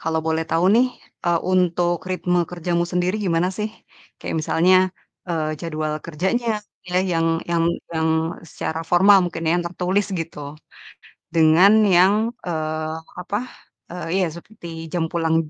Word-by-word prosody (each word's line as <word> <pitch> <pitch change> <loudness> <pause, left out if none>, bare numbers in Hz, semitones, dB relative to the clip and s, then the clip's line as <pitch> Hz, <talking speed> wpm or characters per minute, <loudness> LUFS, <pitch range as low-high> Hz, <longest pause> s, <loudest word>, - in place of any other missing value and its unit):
kalau 160 0 0
boleh 160 0 0
tahu 165 +2 +2
nih, 245 +2 +5 0.4
eee, 170 -1 +2
untuk 175 -1 +2
ritme 180 -1 0
kerjamu 175 0 -1
sendiri 180 +3 +1
gimana 170 +1 +2
sih? 210 - 0 0.5
Kayak - - -3
misalnya, 180 +4 +4 0.5
eee, 155 -3 -1
jadwal 155 -2 -3
kerjanya, 190 +9 -1 0.4
pilih 180 +1 0
yang 165 0 +1 0.2
yang 170 -1 +2 0.3
yang 160 0 +1 0.4
secara 160 +1 -4
formal 195 +3 +7
mungkin 175 -1 -4
ya, 160 - +3
yang 175 - -3
tertulis 185 +3 0
gitu. 165 -2 -7 1.0
Dengan 165 +5 +6 0.2
yang, 185 +3 +6 0.3
eee, 155 -2 -2 0.3
apa, 200 +3 -2 0.5
eee, 180 0 -6 0.2
iya - - +2
seperti 175 0 -11 0.2
jam 170 -2 0
pulang 165 -2 +1
175 Hz, 140 wpm, -22 LUFS, 160-180 Hz, 1.0 s, formal